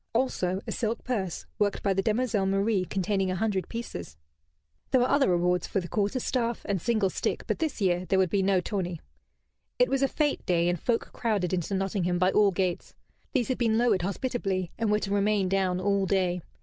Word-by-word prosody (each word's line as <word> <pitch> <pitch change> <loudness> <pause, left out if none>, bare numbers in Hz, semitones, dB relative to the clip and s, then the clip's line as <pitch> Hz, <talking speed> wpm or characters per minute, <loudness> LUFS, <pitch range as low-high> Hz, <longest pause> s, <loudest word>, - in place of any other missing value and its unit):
Also 195 -7 0
a - - -4
silk 225 0 -2
purse, 195 -9 -3
worked 205 -1 0
by 195 - +2
the 195 - +1
demoiselle 215 -2 +1
Marie, 195 0 +1
containing 195 0 0
a 185 - -1
hundred 195 -2 -1
pieces. 90 - -6 0.7
There 260 - +4
were 245 - +3
other 280 -4 +3
rewards 180 0 +1
for - - 0
the 175 - -5
quarter 205 +8 0
staff 235 -2 -1
and 195 -4 -1
single 215 -4 +1
stick, - - -2
but - - -2
this 320 -6 -2
year 180 -1 +1
there 190 - +1
would 185 -3 +2
be 200 - +2
no 190 -1 +2
tourney. 180 -4 -3 0.8
It 250 - +4
was 270 0 +1
a 275 - +4
fête 295 -2 0
day, 170 -1 +2
and 175 -1 -1
folk 235 -2 -1
crowded 205 -7 -1
into 185 +2 -1
Nottingham 190 -2 0
by 185 +1 +3
all 210 -1 +5
gates. 185 -2 -2 0.4
These 255 -4 +1
had 255 - -1
been 225 -2 +2
lowered 230 -6 +3
hospitably 195 -2 -2
and 225 -1 -1
were 210 - +4
to 200 - -2
remain 205 -1 +2
down 185 -1 +1
all 200 0 +1
day. 180 -2 +1
195 Hz, 205 wpm, -28 LUFS, 185-225 Hz, 0.8 s, all